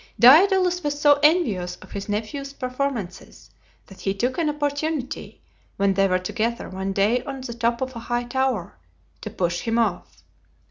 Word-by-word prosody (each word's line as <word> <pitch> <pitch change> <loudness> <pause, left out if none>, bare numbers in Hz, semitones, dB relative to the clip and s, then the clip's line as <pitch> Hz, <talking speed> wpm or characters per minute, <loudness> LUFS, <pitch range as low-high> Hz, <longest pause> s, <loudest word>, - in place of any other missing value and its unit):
Daedalus 360 - +6
was 290 -1 -2
so 290 -1 +5
envious 230 - +2
of - - -16
his 200 -1 -6
nepnew's 230 +7 -4
performances 255 -8 -5 0.3
that 195 - -15
he 195 0 -1
took 245 - -1
an 320 -2 +1
opportunity, 295 -1 -3 0.3
when 195 0 +2
they 195 +1 +3
were 185 -1 +2
together 225 +6 -2
one 190 +1 -4
day 210 +6 +1
on 270 -1 -6
the 250 -2 -6
top 235 +1 -1
of 260 -1 -3
a - - -5
high 240 +1 -2
tower, 240 - -2 0.4
to 215 - -5
push 175 -5 -1
him 230 0 -1
off. 230 - -2
240 Hz, 170 wpm, -23 LUFS, 200-285 Hz, 0.4 s, Daedalus